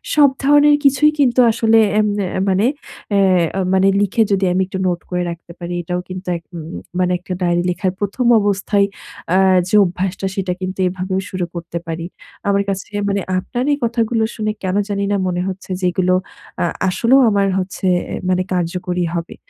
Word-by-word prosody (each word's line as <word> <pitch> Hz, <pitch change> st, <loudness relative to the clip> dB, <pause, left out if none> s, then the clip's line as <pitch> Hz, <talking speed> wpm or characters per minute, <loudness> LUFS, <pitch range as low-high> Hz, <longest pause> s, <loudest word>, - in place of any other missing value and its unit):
সব 290 Hz, -2 st, +6 dB
ধরনের 290 Hz, +1 st, +6 dB
কিছুই 280 Hz, +2 st, +4 dB
কিন্তু 255 Hz, -3 st, +3 dB
আসলে 225 Hz, 0 st, +3 dB, 0.2 s
এম 210 Hz, -, +2 dB, 0.2 s
এ -, -, -1 dB, 0.2 s
মানে 190 Hz, +3 st, +2 dB, 0.5 s
অ্যা 190 Hz, -2 st, +2 dB
মানে 190 Hz, +1 st, +4 dB
লিখে 205 Hz, +3 st, +1 dB
যদি 195 Hz, -1 st, +2 dB
আমি 185 Hz, +1 st, +1 dB
একটু 190 Hz, -, -5 dB
নোট 175 Hz, -1 st, 0 dB
করে 180 Hz, 0 st, -1 dB
রাখতে 170 Hz, 0 st, -9 dB
পারি 175 Hz, 0 st, -5 dB
এটাও 180 Hz, +1 st, -3 dB
কিন্তু 185 Hz, +1 st, -7 dB
এক 165 Hz, -, -15 dB
ম -, -, -5 dB, 0.4 s
মানে 180 Hz, 0 st, +2 dB
একটা 185 Hz, 0 st, -6 dB
ডায়েরি 175 Hz, -1 st, +1 dB
লেখার 185 Hz, +1 st, -1 dB
১ম 205 Hz, +5 st, -2 dB
অবস্থায় 200 Hz, 0 st, +1 dB, 0.5 s
আ -, -, +5 dB, 0.3 s
যে 200 Hz, -, +1 dB
অভ্যাসটা 185 Hz, +2 st, -3 dB
সেটা 185 Hz, -2 st, -1 dB
কিন্তু 185 Hz, +1 st, -4 dB
এভাবেও 185 Hz, +1 st, -2 dB
শুরু 185 Hz, -2 st, -2 dB
করতে 170 Hz, 0 st, -5 dB
পারি। 165 Hz, +1 st, -4 dB, 0.4 s
আমার 200 Hz, 0 st, +2 dB
কাছে 195 Hz, -1 st, -3 dB, 0.2 s
মানে 200 Hz, 0 st, 0 dB, 0.2 s
আপনার 245 Hz, +7 st, -3 dB
এই -, -, 0 dB
কথাগুলো 230 Hz, -1 st, 0 dB
শুনে 215 Hz, -1 st, -1 dB
কেন 185 Hz, 0 st, -1 dB
জানিনা 200 Hz, 0 st, 0 dB
মনে 180 Hz, -1 st, -1 dB
হচ্ছে 190 Hz, 0 st, -6 dB
যে, -, -, 0 dB
এগুলো 185 Hz, +1 st, +1 dB, 0.5 s
আ -, -, +2 dB, 0.3 s
আসলেও 245 Hz, +8 st, +3 dB
আমার 200 Hz, -1 st, +2 dB
হচ্ছে 185 Hz, +1 st, -5 dB, 0.3 s
এ -, -, -1 dB
মানে 185 Hz, 0 st, +2 dB
কার্যকরী 180 Hz, 0 st, -2 dB
হবে। 170 Hz, -1 st, -4 dB
190 Hz, 180 wpm, -18 LUFS, 180-205 Hz, 0.5 s, সব